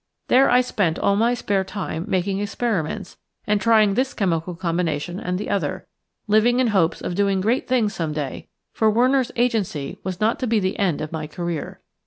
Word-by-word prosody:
There 265 +2 +5
I 250 - +5
spent 195 -9 0
all 200 - +2
my 230 +4 +2
spare 200 -5 0
time 185 -4 -5
making 190 +1 0
experiments 205 -3 -2 0.3
and 210 -1 +1
trying 215 -1 +4
this 260 +5 0
chemical 175 -3 -1
combination 170 -1 -2
and 180 0 -2
the 205 - -4
other, 185 -1 -2 0.4
living 225 +3 +3
in 255 -2 +3
hopes 185 -6 +1
of - - -3
doing 195 0 +1
great 225 +7 0
things 235 -5 +1
some 165 -3 -2
day, 150 -3 -5 0.3
for 220 - +3
Werner's 255 +3 +2
Agency 220 - -1
was 185 -1 -4
not 220 +2 +1
to 255 - -1
be 225 -1 +2
the 190 0 -2
end 180 -7 +1
of 155 - -5
my 155 -2 -4
career. 170 0 -5
200 Hz, 190 wpm, -22 LUFS, 175-225 Hz, 0.4 s, There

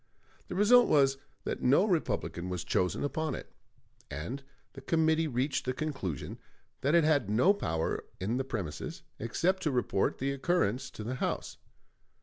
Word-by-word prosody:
The - - -5
result 235 +5 +6
was 135 -2 +4 0.2
that - - -3
no 140 +10 +5
Republican 155 - -1
was 90 -1 -3
chosen 90 -1 0
upon 155 +2 -1
it; - - -9 0.6
and 85 - -5 0.3
the 135 - -10
committee 160 +2 +2
reached 135 +1 -1
the 130 - 0
conclusion 130 - -4 0.4
that 140 +5 +3
it 170 - +6
had 145 -9 +2
no 125 - +5
power 80 - -2 0.2
in 105 +7 -1
the 135 - 0
premises, 120 - -5 0.2
except 180 - 0
to 155 - +1
report 125 -6 +1
the 135 +1 -1
occurrence 135 - 0
to 110 - -8
the 120 +4 -3
House. - - -2
135 Hz, 155 wpm, -31 LUFS, 110-160 Hz, 0.6 s, result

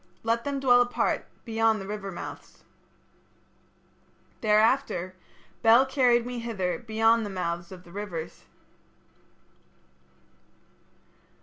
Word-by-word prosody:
Let 230 +1 0
them 280 -1 -2
dwell 245 -2 +5
apart 245 0 0 0.2
beyond 225 -1 +1
the 195 - -7
river 200 -1 -5
mouths.' - - -9 1.8
"Thereafter 215 -3 +2 0.5
Bel 235 +3 +6
carried 250 -3 +2
me 245 -1 -5
hither 205 -6 -3
beyond 225 0 +2
the 205 - -4
mouths 175 -2 -4
of 185 -1 -11
rivers." 175 -3 -7
225 Hz, 95 wpm, -27 LUFS, 195-240 Hz, 1.8 s, Bel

